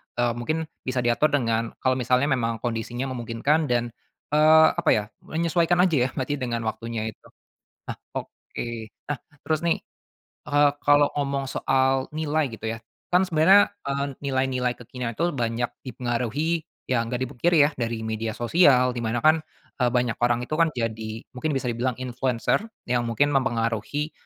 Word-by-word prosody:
eee, 120 -1 +1
mungkin 155 +7 -2 0.2
bisa 130 -1 0
diatur 120 +5 +3
dengan 115 -4 0
kalau 130 0 +3
misalnya 125 +3 +2
memang 115 -3 0
kondisinya 120 +2 -3
memungkinkan 130 +6 0
dan, 120 -1 0 0.4
eee, 155 +1 +7
apa - - +1
ya, 105 - 0 0.2
menyesuaikan 170 +1 +1
aja 150 -9 +3
ya - - -8
berarti 140 +2 -2
dengan 120 -3 -2
waktunya 115 0 -3
itu. - - -22 0.6
Nah - - -4 0.2
oke, - - -6 0.4
nah 145 - -1 0.3
terus 155 -1 +1
nih, 170 - +1 0.7
eee, 145 0 +4
kalau 145 0 +5
ngomong 140 -1 -1
soal 130 0 +1
nilai 155 0 0
gitu 110 0 -5
ya, 115 - -3 0.3
kan 180 +2 +4
sebenarnya, 185 +5 +5 0.2
eee, 140 0 0
nilai-nilai 130 -2 0
kekinian 125 0 -5
itu 170 +2 +1
banyak 120 -2 -1 0.2
dipengaruhi 130 +6 -1 0.2
ya 125 -2 +1
gak 125 - -2
dipungkiri 145 +5 +2
ya 145 - +2
dari 115 -1 -2
media 110 0 -3
sosial 125 -1 +4
di 120 - -4
mana 115 0 -1
kan, 155 +1 +5 0.4
eee, 125 - +4
banyak 120 -1 0
orang 120 0 +2
itu 125 - -12
kan 165 - +5
jadi 110 -1 -3
mungkin 140 +2 -2
bisa 135 - -2
dibilang 120 +1 -1
influencer 125 - 0 0.2
yang 120 -1 0
mungkin 145 +6 +2
mempengaruhi, 130 +3 -1
130 Hz, 160 wpm, -25 LUFS, 120-145 Hz, 0.7 s, eee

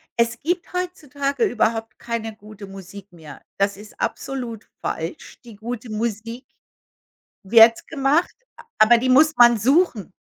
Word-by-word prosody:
„Es 235 0 0
gibt 350 +3 -3
heutzutage 285 -7 -3
überhaupt 225 -1 -1
keine 225 -2 -5
gute 210 -1 -12
Musik 195 0 -12
mehr.“ 155 -5 -13 0.2
Das 200 0 0
ist 210 +1 -15
absolut 245 -5 -5
falsch. 165 +2 -6
Die 230 -3 -13
gute 230 +2 -7
Musik 230 +2 -4 1.0
wird 225 +3 +6
gemacht, 280 +5 0 0.4
aber 230 +2 +6
die 255 +2 -1
muss 305 +5 +5
man 240 -1 +7
suchen. 255 - +1
230 Hz, 130 wpm, -21 LUFS, 210-260 Hz, 1.0 s, man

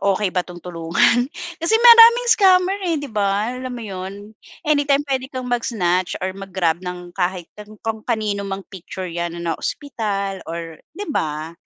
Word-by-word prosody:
okey 200 -1 +1
ba 180 - +1
'tong 175 -1 -11
tulungan? 175 +9 +2 0.3
Kasi 340 +7 +1
maraming 470 0 +8
scammer 380 -2 +4
eh, 330 - +1
di 285 - -5
ba, 205 +2 0
alam 255 0 -5
mo 240 - -6
yon? 195 +2 -7 0.3
Anytime 290 -1 +2
pwede 265 -1 -2
kang 255 -2 -6
mag-snatch 185 -7 0
or 190 - -2
mag-grab 185 -3 -1
ng 180 -1 -7
kahit 180 -1 -2
an 210 +1 -12
kung 225 -1 -2
kanino 215 -4 -1
mang 195 0 -5
picture 185 0 -7
yan 170 0 -4
na 170 -1 -2
naospital 200 - -3
or, 165 -1 -6 0.2
di 410 - -4
ba? 155 - -2
200 Hz, 165 wpm, -21 LUFS, 180-260 Hz, 0.3 s, maraming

